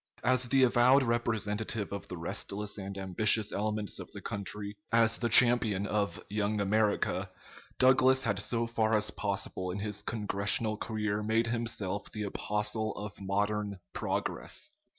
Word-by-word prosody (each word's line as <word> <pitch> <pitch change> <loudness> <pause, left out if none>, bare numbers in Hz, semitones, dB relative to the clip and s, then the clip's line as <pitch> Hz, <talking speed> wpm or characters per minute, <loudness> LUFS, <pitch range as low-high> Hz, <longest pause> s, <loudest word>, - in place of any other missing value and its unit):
As 130 0 +2
the 135 +2 +3
avowed 125 +2 +5
representative 110 -3 -1
of 100 - -6
the 90 - -6
restless 100 +5 -3
and 100 0 -6
ambitious 105 +3 +2
elements 105 0 -2
of - - -9
the - - -8
country, 105 +1 -5 0.2
as 115 -1 +3
the 120 - 0
champion 110 -4 +5
of 105 -1 -1
"Young 105 +1 -1
America," 105 +1 +1 0.5
Douglas 130 0 +5
had 100 -4 0
so 115 +3 +1
far 115 -1 +1
as 105 0 +2
possible 95 -2 -3
in 90 - -3
his 105 0 -3
Congressional 105 0 0
career 105 -1 -2
made 110 +2 +1
himself 115 -4 -2
the 105 - -4
apostle 105 +2 -2
of 100 -2 -8
modern 100 +1 -1 0.2
"progress." - - -3
105 Hz, 145 wpm, -30 LUFS, 100-115 Hz, 0.5 s, avowed